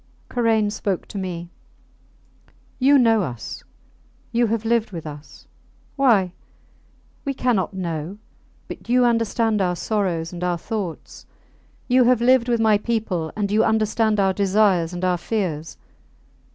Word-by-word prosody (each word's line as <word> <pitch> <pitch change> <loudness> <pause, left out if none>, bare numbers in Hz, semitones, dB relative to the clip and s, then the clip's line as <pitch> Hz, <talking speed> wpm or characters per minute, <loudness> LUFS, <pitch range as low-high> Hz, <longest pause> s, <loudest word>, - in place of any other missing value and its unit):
Karain 225 -4 +1
spoke 200 -3 -2
to 205 - -5
me. 175 -2 -5 1.3
You 275 +2 +5
know 225 -4 +4
us. 125 - -6 0.7
You 240 0 +2
have 225 0 -2
lived 230 -1 +1
with 165 -4 -7
us. 150 0 -10 0.5
Why? 215 -10 +3 0.9
we 275 -2 -3
cannot 215 -7 0
know; 170 0 -4 0.5
but - - -10
you 250 0 +4
understand 230 -2 +1
our 180 -1 +1
sorrows 175 -4 -2
and 175 0 -6
our 175 -1 0
thoughts. 195 -3 -6 0.6
You 250 0 +4
have 250 -1 +4
lived 250 0 +3
with 235 -1 +2
my 215 -2 +4
people, 205 -8 -2
and 205 -2 -2
you 215 +2 +3
understand 220 -1 +1
our 195 -1 +3
desires 195 -3 +2
and 175 +1 -3
our 180 -1 +1
fears. 175 -7 -3
210 Hz, 140 wpm, -22 LUFS, 180-230 Hz, 1.3 s, You